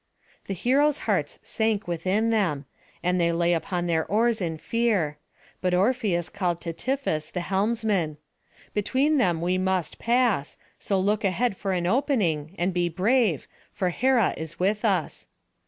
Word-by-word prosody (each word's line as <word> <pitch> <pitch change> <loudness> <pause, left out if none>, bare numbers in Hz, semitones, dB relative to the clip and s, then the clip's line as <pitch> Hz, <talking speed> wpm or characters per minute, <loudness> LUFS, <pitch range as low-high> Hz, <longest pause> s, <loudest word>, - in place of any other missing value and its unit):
The 195 - -3
heroes' 280 - +2
hearts - - 0
sank 220 -3 -1
within 190 +7 0
them, 170 -11 0 0.4
and 180 0 +1
they 170 0 +3
lay 170 +1 +2
upon 175 +1 -1
their 165 -2 +1
oars 225 +1 +2
in 165 -3 -2
fear; 195 -8 0 0.4
but 180 -1 +1
Orpheus 195 -4 +1
called 180 -4 -2
to 170 -2 -4
Tiphys 235 - -2
the 180 - -3
helmsman: 195 -4 0 0.6
"Between 270 +8 +2
them 175 -8 +2
we 180 +2 +1
must 185 -3 -1
pass; 235 - +1 0.2
so 195 -2 0
look 205 +3 +1
ahead 200 +3 +1
for 195 +1 -3
an 175 -1 -1
opening, 190 - 0
and 180 +2 0
be 175 -1 +1
brave, 200 - +1 0.2
for 185 -3 -1
Hera 245 +1 +2
is 160 0 -6
with 205 +4 +1
us." 190 -8 0
190 Hz, 155 wpm, -26 LUFS, 170-225 Hz, 0.6 s, they